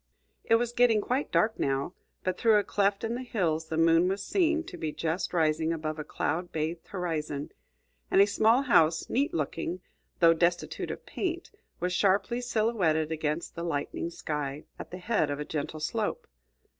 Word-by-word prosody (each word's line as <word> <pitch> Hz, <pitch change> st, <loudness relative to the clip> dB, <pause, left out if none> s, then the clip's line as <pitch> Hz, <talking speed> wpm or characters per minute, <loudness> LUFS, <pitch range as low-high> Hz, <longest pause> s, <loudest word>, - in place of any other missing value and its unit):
It 225 Hz, -, +4 dB
was 235 Hz, 0 st, +1 dB
getting 240 Hz, -2 st, +4 dB
quite 255 Hz, +7 st, -1 dB
dark 220 Hz, +1 st, +2 dB
now, 135 Hz, +5 st, 0 dB, 0.3 s
but 185 Hz, -1 st, 0 dB
through 220 Hz, +2 st, +4 dB
a 205 Hz, -, +2 dB
cleft 200 Hz, 0 st, 0 dB
in 225 Hz, +1 st, -1 dB
the 245 Hz, -, -3 dB
hills 165 Hz, -10 st, -1 dB
the 160 Hz, -, -2 dB
moon 165 Hz, +2 st, +5 dB
was 195 Hz, +1 st, -1 dB
seen 330 Hz, -, +2 dB
to -, -, -9 dB
be 155 Hz, -1 st, -3 dB
just 165 Hz, +3 st, -2 dB
rising 160 Hz, -1 st, +1 dB
above 155 Hz, -1 st, -3 dB
a -, -, -3 dB
cloud 170 Hz, +3 st, -2 dB
bathed 160 Hz, +2 st, -3 dB
horizon, 155 Hz, -6 st, -3 dB, 0.6 s
and -, -, +4 dB
a 200 Hz, -, +8 dB
small 220 Hz, +5 st, +3 dB
house, 165 Hz, -, +3 dB
neat 275 Hz, +4 st, +1 dB
looking, 165 Hz, +3 st, -2 dB, 0.4 s
though 165 Hz, -1 st, +7 dB
destitute 170 Hz, +1 st, 0 dB
of -, -, -6 dB
paint, 345 Hz, -2 st, -3 dB, 0.3 s
was 180 Hz, +1 st, -1 dB
sharply 200 Hz, +6 st, +2 dB
silhouetted 215 Hz, -10 st, +1 dB
against 155 Hz, +1 st, -2 dB
the 170 Hz, -, -6 dB
lightening 165 Hz, 0 st, -2 dB
sky, 150 Hz, -3 st, -4 dB, 0.2 s
at -, -, -7 dB
the 180 Hz, -, -7 dB
head 180 Hz, -5 st, 0 dB
of 145 Hz, 0 st, -3 dB
a 150 Hz, -, -3 dB
gentle 155 Hz, +1 st, -4 dB
slope. 220 Hz, -, -2 dB
175 Hz, 180 wpm, -29 LUFS, 160-220 Hz, 0.6 s, a